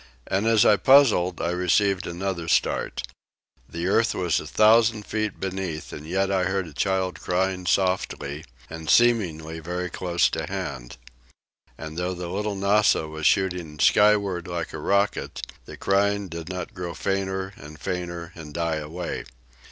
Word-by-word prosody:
And 100 +4 0
as 115 -2 +5
I 105 - +6
puzzled, 110 -8 +5
I 85 - 0
received 95 +2 +1
another 85 -1 -3
start. - - 0 0.7
The 85 +1 -4
earth 110 +5 +2
was 90 -3 +1
a - - -8
thousand 110 0 +4
feet 110 -1 -3
beneath, 95 -5 -4
and 75 - -8
yet 95 +3 0
I 95 -2 +1
heard 95 0 -1
a 80 - -11
child 95 +3 -1
crying 90 0 -1
softly, 85 -6 0 0.2
and 80 -1 -7
seemingly 85 -10 +2
very 90 +2 -4
close 85 -2 +1
to 80 0 -3
hand. 70 -11 -5 0.8
And 80 0 -8
though 90 +1 -2
the 90 -1 -6
"Little 105 +2 -2
Nassau" 100 -4 +2
was 80 -1 0
shooting 90 -5 0
skyward 100 +2 +3
like 85 -2 -4
a 80 - -5
rocket, 100 +6 0 0.2
the - - -10
crying 100 0 +1
did 85 0 -7
not 90 -2 -5
grow 90 -2 -5
fainter 95 0 -2
and 75 +3 -12
fainter 85 -2 -4
and 75 -3 -10
die 85 -2 0
away. 80 +4 -5
90 Hz, 155 wpm, -25 LUFS, 85-100 Hz, 0.8 s, I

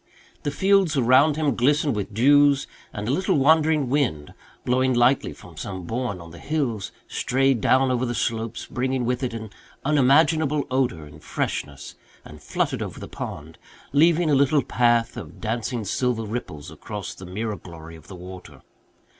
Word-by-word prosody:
The - - -2
fields 190 0 +2
around 130 +4 +5
him 150 -5 0
glistened 145 +2 +2
with 105 0 -4
dews, 140 +5 +4 0.3
and 105 +1 -5
a - - +1
little 185 +2 +1
wandering 155 0 +3
wind, 120 - -1 0.3
blowing 130 +1 +2
lightly 120 +3 +3
from - - -14
some 95 -2 -6
bourne 110 0 -3
in 85 -1 -11
the 85 - -12
hills, 130 -10 -2 0.2
strayed 135 -2 +1
down 130 +3 +3
over 125 0 0
the 120 -1 -2
slopes, 115 0 -2
bringing 130 0 -2
with 125 +2 -1
it 125 -3 -2
an 110 -2 -7 0.3
unimaginable 150 +1 +3
odour 125 - 0
and 75 +1 -15
freshness, 70 -1 -4 0.3
and 75 -1 -12
fluttered - - -2
over - - -5
the - - -8
pond, 80 +2 -8 0.3
leaving 165 +2 +4
a - - +4
little 140 +1 +3
path 120 0 +1
of 85 -8 -9
dancing 115 0 -3
silver 120 +2 -1
ripples 105 -9 -6
across 105 -3 -7
the 90 - -11
mirror 105 +3 -4
glory 80 -1 -11
of 80 0 -16
the 95 - -9
water. 90 +1 -11
125 Hz, 165 wpm, -24 LUFS, 105-140 Hz, 0.3 s, around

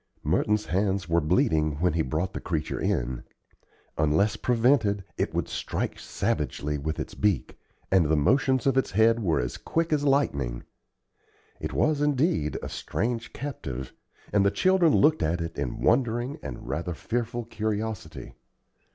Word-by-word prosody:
Merton's 105 0 +1
hands 95 +1 0
were 85 0 +2
bleeding 75 -1 +2
when 90 -1 +2
he 80 - +1
brought 80 +6 -2
the - - -4
creature 80 -4 -3
in. 60 0 -1 0.8
Unless 80 +7 +3
prevented, 115 -5 +2
it - - -1
would - - 0
strike - - -3
savagely 75 +1 -2
with 80 +3 -3
its - - -5
beak, 105 -4 0 0.3
and 95 -4 +5
the 80 - +3
motions 130 - +2
of 135 -1 +4
its - - -1
head 115 +3 +3
were 85 -6 +1
as - - -3
quick 165 -1 -1
as 145 -1 +1
lightning. 70 - +1 1.0
It - - -4
was, 155 -2 +1
indeed, 145 - +1
a - - -3
strange 115 +2 -3
captive, 65 - -6 0.4
and 100 -1 +4
the 100 - +4
children 185 - +3
looked 155 +2 +4
at 85 +3 +1
it 85 0 -4
in 70 -3 -3
wondering 120 +2 +1
and - - -7
rather 85 +3 -3
fearful 120 +4 -2
curiosity. 105 - -4
100 Hz, 150 wpm, -27 LUFS, 80-125 Hz, 1.0 s, and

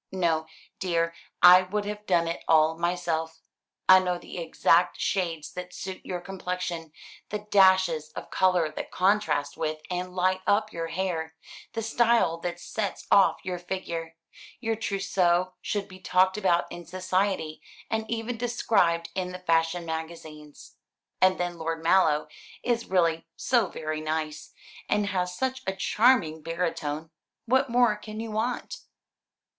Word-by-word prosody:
No, 165 -4 0 0.3
dear, 170 -2 0 0.3
I 180 +1 +10
would 205 +3 -3
have 210 0 -6
done 170 -2 +3
it 165 - -4
all 160 0 +4
myself. 165 -2 -2 0.5
I 185 0 +9
know 180 -1 -1
the 175 - -8
exact 170 +1 +2
shades 170 -6 -2
that 180 0 -7
suit 190 0 -6
your 180 -1 -4
complexion, 180 -3 -5 0.4
the 210 0 -5
dashes 185 -5 +4
of - - -8
colour 180 -3 +3
that - - -6
contrast 165 -7 +1
with 155 -1 -2
and 180 0 -3
light 185 +1 +1
up 215 +1 +2
your 165 -1 -3
hair, 165 -2 -3 0.4
the 225 - -3
style 225 -7 +2
that 175 0 -4
sets 205 +2 -4
off 200 -1 +5
your 180 -1 -3
figure. 170 -2 -5 0.4
Your 225 -2 -1
trousseau 185 -4 +1
should 205 -2 -2
be 185 -1 -13
talked 185 +1 +3
about 180 -4 +2
in 175 - -7
society, 185 -2 -1 0.3
and 220 0 -2
even 230 +1 -3
described 215 -8 +1
in 180 -1 -3
the 180 - -6
fashion 165 -1 +1
magazines. 160 -2 -8 0.4
And 185 0 +4
then 175 -1 -3
Lord 165 0 -3
Mallow 165 -4 +3 0.4
is 235 -1 0
really 165 -3 +1
so 235 -6 +2
very 155 -2 -4
nice 155 0 -3 0.4
and 210 0 +2
has 180 -2 -2
such 260 0 -1
a 190 - -1
charming 200 -6 +3
baritone 160 -2 -3 0.3
what 260 +3 +2
more 240 -2 +4
can 215 +1 -8
you 225 -1 -5
want?" 225 +3 -2
180 Hz, 145 wpm, -27 LUFS, 165-200 Hz, 0.5 s, I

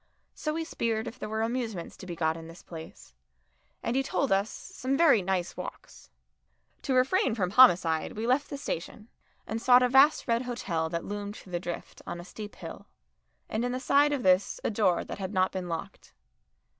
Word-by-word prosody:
So 305 -1 -3
we 325 - -1
speered 230 -8 -2
if 245 - -8
there - - -5
were 220 +1 -1
amusements 225 -6 -3
to 185 - -10
be 175 - -5
got 160 -1 +1
in 165 0 -9
this 165 +1 -13
place, 160 - -11 0.7
and 235 - -1
he 270 - +3
told 270 0 -1
us 195 +2 +2
"some 265 +2 -3
very 300 -10 +5
nice 185 -1 -1
walks." - - -9 0.7
To 265 - 0
refrain 255 - +3
from 185 -5 -1
homicide 175 -9 +5
we 220 +2 -4
left 255 +4 +1
the 285 - -5
station, 215 -3 -5 0.4
and 225 +1 -4
sought 250 +1 +6
a 250 - +3
vast 275 +5 +5
red 230 -1 +2
hotel 190 -10 -2
that 170 0 -3
loomed 205 0 -5
through 185 - -13
the 175 - -1
drift 175 -1 -7
on 175 - -5
a 175 - -9
steep 210 +2 -9
hill, - - -9 0.6
and 220 +2 -2
in 245 0 -1
the 255 - -2
side 285 +2 +4
of 280 -4 -1
this 185 +1 +3
a - - 0
door 200 -5 +2
that - - -7
had 190 +1 -4
not 185 0 +3
been 185 -2 -4
locked. 165 -1 -7
220 Hz, 205 wpm, -29 LUFS, 180-255 Hz, 0.7 s, sought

